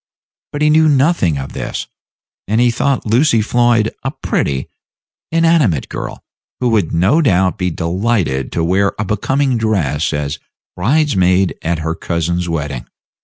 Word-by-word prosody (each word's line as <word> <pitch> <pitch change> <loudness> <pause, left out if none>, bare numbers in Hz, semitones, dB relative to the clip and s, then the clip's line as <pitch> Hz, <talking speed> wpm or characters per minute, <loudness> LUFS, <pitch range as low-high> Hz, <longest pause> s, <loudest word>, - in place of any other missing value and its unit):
But 145 +1 -2
he 150 - +4
knew 155 0 +4
nothing 140 - +2
of 70 0 -6
this, - - -4 0.6
and 110 +3 +1
he 120 0 +4
thought 135 +3 0
Lucy 115 +2 +3
Floyd 115 0 +2
a 135 - -2
pretty, 70 - -2 0.6
inanimate 165 - +2
girl, - - -6 0.4
who 125 - +1
would 105 -8 +1
no 95 - +3
doubt 95 - +2
be 90 -1 0
delighted 85 - -1
to 85 - 0
wear 95 +4 +1
a 105 - -2
becoming 125 +5 0
dress 80 -9 0
as 75 +1 -3 0.4
bridesmaid 95 - +2
at 85 0 -1
her 80 - 0
cousin's 85 +1 -2
wedding. 75 -6 -4
100 Hz, 145 wpm, -16 LUFS, 85-125 Hz, 0.6 s, he